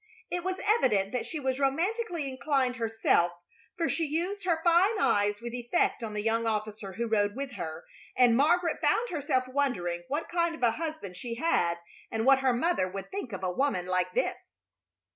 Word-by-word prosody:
It 355 Hz, -1 st, -2 dB
was 375 Hz, 0 st, -2 dB
evident 230 Hz, -, +3 dB
that 250 Hz, -, -2 dB
she 315 Hz, -, -4 dB
was 265 Hz, -1 st, -1 dB
romantically 340 Hz, -, 0 dB
inclined 260 Hz, -1 st, 0 dB
herself, 225 Hz, -6 st, +2 dB, 0.4 s
for 335 Hz, -1 st, +1 dB
she 335 Hz, -, 0 dB
used 355 Hz, +7 st, -2 dB
her 335 Hz, -3 st, +2 dB
fine 365 Hz, +5 st, +4 dB
eyes 205 Hz, -, +2 dB
with 235 Hz, 0 st, -6 dB
effect 245 Hz, +4 st, 0 dB
on 215 Hz, -2 st, -5 dB
the 210 Hz, -, -2 dB
young 225 Hz, +1 st, +1 dB
officer 215 Hz, -2 st, -3 dB
who 235 Hz, +6 st, -2 dB
rode 205 Hz, -2 st, +1 dB
with 275 Hz, 0 st, -4 dB
her, 160 Hz, -8 st, -6 dB, 0.3 s
and 245 Hz, -2 st, +6 dB
Margaret 335 Hz, +6 st, +2 dB
found 485 Hz, +1 st, +2 dB
herself 275 Hz, -5 st, 0 dB
wondering 250 Hz, -11 st, -1 dB
what 300 Hz, +3 st, -2 dB
kind 340 Hz, -1 st, 0 dB
of 285 Hz, -, -9 dB
a 235 Hz, -, +5 dB
husband 310 Hz, -, -5 dB
she 235 Hz, +3 st, -5 dB
had 175 Hz, -, +1 dB, 0.3 s
and 225 Hz, 0 st, -2 dB
what 270 Hz, 0 st, +6 dB
her 265 Hz, -1 st, +3 dB
mother 245 Hz, -, +1 dB
would 195 Hz, 0 st, -7 dB
think 380 Hz, -12 st, -5 dB
of 190 Hz, -1 st, -6 dB
a 185 Hz, -, 0 dB
woman 260 Hz, -7 st, 0 dB
like 185 Hz, 0 st, 0 dB
this. -, -, -2 dB
255 Hz, 190 wpm, -29 LUFS, 215-330 Hz, 0.4 s, and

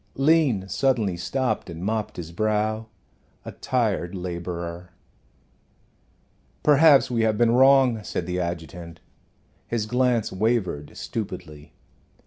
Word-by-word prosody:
Lean 135 Hz, -, +2 dB
suddenly 110 Hz, -3 st, 0 dB
stopped 110 Hz, +6 st, -2 dB
and 85 Hz, +1 st, -7 dB
mopped 110 Hz, 0 st, -2 dB
his 85 Hz, -2 st, -7 dB
brow 110 Hz, +3 st, -1 dB, 0.6 s
a -, -, -6 dB
tired 105 Hz, -7 st, -1 dB
laborer. 85 Hz, -1 st, -5 dB, 1.7 s
"Perhaps 145 Hz, -2 st, +5 dB
we 115 Hz, -2 st, +1 dB
have 110 Hz, -1 st, +1 dB
been 115 Hz, 0 st, +3 dB
wrong," 130 Hz, -3 st, +4 dB
said 90 Hz, -, -4 dB
the 90 Hz, +1 st, -3 dB
adjutant. 85 Hz, -1 st, -6 dB, 0.7 s
His 115 Hz, -3 st, -2 dB
glance 125 Hz, -1 st, +1 dB
wavered 95 Hz, -7 st, -1 dB
stupidly. 85 Hz, -8 st, -7 dB
105 Hz, 110 wpm, -24 LUFS, 85-120 Hz, 1.7 s, Perhaps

